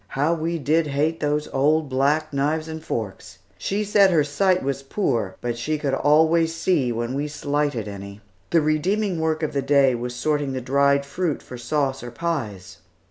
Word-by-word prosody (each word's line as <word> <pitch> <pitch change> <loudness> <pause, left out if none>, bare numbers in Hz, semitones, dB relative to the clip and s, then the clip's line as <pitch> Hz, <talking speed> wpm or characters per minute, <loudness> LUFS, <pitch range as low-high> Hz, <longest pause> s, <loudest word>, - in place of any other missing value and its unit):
How 150 +4 +2
we 165 +1 -2
did 155 +2 +1
hate 150 +3 0
those 150 0 0
old 150 +3 +2
black 145 +4 +1
knives 150 +3 0
and 160 0 -7
forks! 100 -3 -5 0.2
She 200 - -1
said 205 -1 +5
her 165 -5 +3
sight 180 +6 +1
was 135 0 -2
poor 125 - -1
but 120 -1 -3
she 155 +5 -1
could 145 -2 -2
always 160 +3 +3
see 165 -7 +1
when 120 +2 -2
we 145 +2 -2
slighted 145 -5 -2
any. 100 0 -8 0.3
The 165 - +4
redeeming 175 +5 0
work 160 0 0
of 155 - -1
the 140 - 0
day 135 -1 +4
was 120 +1 -4
sorting 145 +1 -1
the 130 - -2
dried 140 +2 +2
fruit 165 +1 -2
for 125 - -9
sauce 135 +2 -1
or 120 - -7
pies. 115 - -4
145 Hz, 185 wpm, -23 LUFS, 130-160 Hz, 0.3 s, said